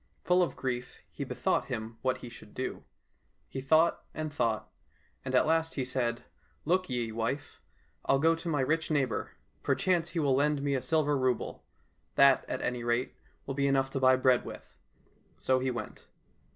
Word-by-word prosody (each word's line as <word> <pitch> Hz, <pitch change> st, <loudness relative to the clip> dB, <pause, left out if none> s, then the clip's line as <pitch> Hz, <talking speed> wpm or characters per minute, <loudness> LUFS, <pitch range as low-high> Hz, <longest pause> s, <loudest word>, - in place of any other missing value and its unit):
Full 180 Hz, +1 st, +4 dB
of 175 Hz, -, 0 dB
grief, 125 Hz, -1 st, -4 dB
he -, -, -5 dB
bethought -, -, 0 dB
him 110 Hz, +1 st, -5 dB
what 130 Hz, -1 st, 0 dB
he -, -, -7 dB
should 110 Hz, -2 st, -13 dB
do. 130 Hz, -, -4 dB, 0.6 s
He 135 Hz, -, -5 dB
thought 160 Hz, +5 st, +3 dB
and 155 Hz, -1 st, -4 dB
thought, 110 Hz, -5 st, 0 dB, 0.6 s
and 130 Hz, 0 st, -2 dB
at -, -, +5 dB
last 160 Hz, +1 st, +1 dB
he 130 Hz, -, -1 dB
said, 120 Hz, -2 st, -1 dB, 0.2 s
" -, -, -38 dB
Look 185 Hz, +2 st, +1 dB
ye, 120 Hz, -3 st, -1 dB
wife! 115 Hz, +6 st, -3 dB, 0.4 s
I'll 135 Hz, -, +4 dB
go 160 Hz, +4 st, +4 dB
to 165 Hz, +1 st, -4 dB
my 145 Hz, -4 st, +1 dB
rich 160 Hz, +5 st, 0 dB
neighbour. 135 Hz, -7 st, 0 dB, 0.3 s
Perchance 175 Hz, -3 st, +1 dB
he 170 Hz, -, -2 dB
will 140 Hz, -4 st, +3 dB
lend 145 Hz, +1 st, +2 dB
me 140 Hz, -1 st, +1 dB
a 130 Hz, -, 0 dB
silver 150 Hz, -1 st, +1 dB
rouble; 130 Hz, -2 st, -1 dB, 0.5 s
that, 140 Hz, -1 st, +5 dB
at 130 Hz, -, -3 dB
any 125 Hz, -1 st, -1 dB
rate, 120 Hz, +2 st, 0 dB, 0.3 s
will 135 Hz, -, -3 dB
be 140 Hz, +1 st, +1 dB
enough 135 Hz, -1 st, +2 dB
to 135 Hz, -, -2 dB
buy 130 Hz, 0 st, +6 dB
bread 130 Hz, -1 st, +3 dB
with." -, -, -10 dB, 0.6 s
So 130 Hz, 0 st, +2 dB
he 130 Hz, +1 st, 0 dB
went. 120 Hz, -4 st, -6 dB
135 Hz, 185 wpm, -30 LUFS, 125-155 Hz, 0.6 s, buy